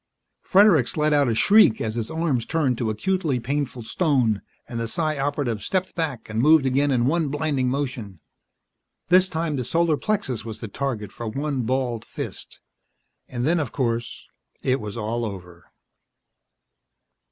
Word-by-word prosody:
Fredericks 185 - +4
let 150 0 +2
out 145 -2 +3
a 115 - 0
shriek 205 - +5
as 110 -1 -2
his 115 -1 -3
arms 160 -8 -1
turned 150 -6 +1
to 115 - 0
acutely 150 - 0
painful 130 0 -3
stone, 125 - +1 0.3
and 115 - -5
the 115 - -2
Psi 155 +3 -1
Operative 135 -6 -1
stepped 185 -1 -1
back 150 -9 -3
and 110 +1 -1
moved 155 +1 +5
again 135 +2 +2
in 125 -3 +2
one 160 +3 +1
blinding 145 -3 0
motion. 125 - -4 0.9
This 185 +1 +6
time 160 -2 -2
the 125 - -1
solar 165 +4 +1
plexus 135 - -2
was 110 -1 -7
the 115 - -6
target 110 -3 -4
for 120 - -7
one 135 0 -2
balled 125 -3 -1
fist. - - -7 0.7
And 120 -1 -3
then, 170 +3 +2
of 150 - -3
course, 120 -3 -2 0.4
it 130 -1 +1
was 105 +1 -6
all 115 +2 -2
over. 90 -5 -8
130 Hz, 160 wpm, -24 LUFS, 115-155 Hz, 0.9 s, This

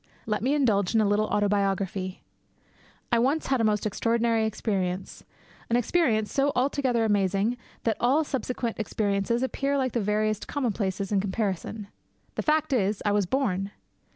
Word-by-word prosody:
Let 210 -1 -1
me 265 +5 +2
indulge 220 -8 +2
in 220 - +5
a - - +3
little 210 +1 +2
autobiography. 195 -2 0 0.9
I 235 - +4
once 275 +7 +1
had 265 -3 +1
a - - +2
most 210 -1 +1
extraordinary 230 +1 +1
experience, 190 -4 -3 0.5
an 235 - +2
experience 240 -4 +1
so 280 +1 +2
altogether 255 -2 +1
amazing 205 +2 +1 0.3
that 225 - +1
all 270 +6 +3
subsequent 250 -5 -3
experiences 210 +2 0
appear 275 +2 0
like 260 -2 0
the 235 - 0
veriest 210 +1 0
commonplaces 200 -7 -2
in 200 -2 +2
comparison. 200 +1 -3 0.5
The - - -2
fact 310 -1 +1
is, 205 -4 +1
I 205 - +3
was 205 -2 +1
born. 195 -6 0
220 Hz, 155 wpm, -27 LUFS, 200-250 Hz, 0.9 s, in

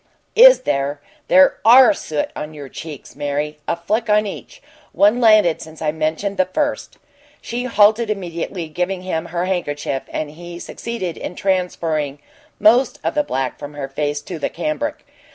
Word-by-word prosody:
"Is - - +8
there? 140 0 -1 0.3
There 280 0 +5
ARE 255 +6 +8
soot 155 - -3
on 150 +1 -6
your 140 -2 -9
cheeks, 150 -2 -9
Mary 145 +1 -3
a - - +1
fleck 215 +7 -2
on 210 0 +4
each. 210 - -8 0.3
One 210 +5 +3
landed 215 -7 +5
since 160 0 -11
I 155 -1 0
mentioned 160 +6 -2
the 185 - +2
first." 290 +9 -2 0.4
She 245 +2 -4
halted 220 -1 +3
immediately, 175 -3 -4
giving 180 +4 -3
him 170 -2 -3
her 175 +1 -2
handkerchief, 145 -7 -2
and 150 -1 -4
he 175 +2 -10
succeeded 185 -2 -5
in 180 - -6
transferring 165 -7 -1 0.4
most 235 +5 +4
of - - -1
the 300 - +2
black 135 - -3
from 145 0 -8
her 140 -2 -4
face 145 +1 -3
to 170 0 -7
the - - -1
cambric. 300 0 -3
175 Hz, 165 wpm, -19 LUFS, 150-215 Hz, 0.4 s, Is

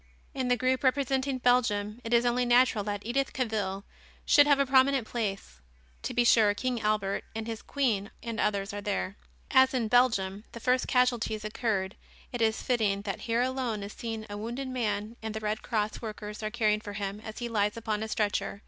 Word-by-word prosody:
In 260 -3 -2
the 245 0 +3
group 255 +3 +1
representing 270 0 +1
Belgium 235 -3 +1
it 230 - -5
is 235 0 +4
only 245 +1 +2
natural 245 -3 +4
that 205 -1 -4
Edith 270 +4 -1
Cavil 210 -6 -2 0.4
should 290 0 +6
have 285 -1 +5
a 275 - +2
prominent 265 -1 +4
place. 195 - -4 0.4
To - - -4
be 245 - +4
sure 215 -3 +5
King 250 +1 -2
Albert 210 -2 0
and 225 0 -3
his 225 -1 -5
queen 225 -8 -1
and 230 -1 -4
others 200 -1 0
are 205 - -4
there. 200 -1 -2 0.4
As 260 0 +5
in 230 -4 0
Belgium 210 -5 +2
the 235 - -7
first 250 +2 +1
casualties 240 -4 +1
occurred 210 -3 -1 0.4
it 245 - -4
is 220 -1 +1
fitting 210 -5 +1
that 195 -2 -4
here 230 +2 +2
alone 250 -5 -2
is 200 - -7
seen 225 -2 -5
a 205 - -6
wounded 240 +5 -4
man 220 -2 -2
and 220 -1 -5
the - - -2
Red 215 0 -2
Cross 215 -2 -2
workers 210 -2 -6
are 215 - -2
caring 215 -2 +1
for 205 -2 -7
him 200 0 -4
as 220 0 -9
he 240 - -3
lies 210 -2 0
upon 215 -2 -2
a 220 - -2
stretcher. 205 -2 -1
225 Hz, 200 wpm, -29 LUFS, 210-250 Hz, 0.4 s, should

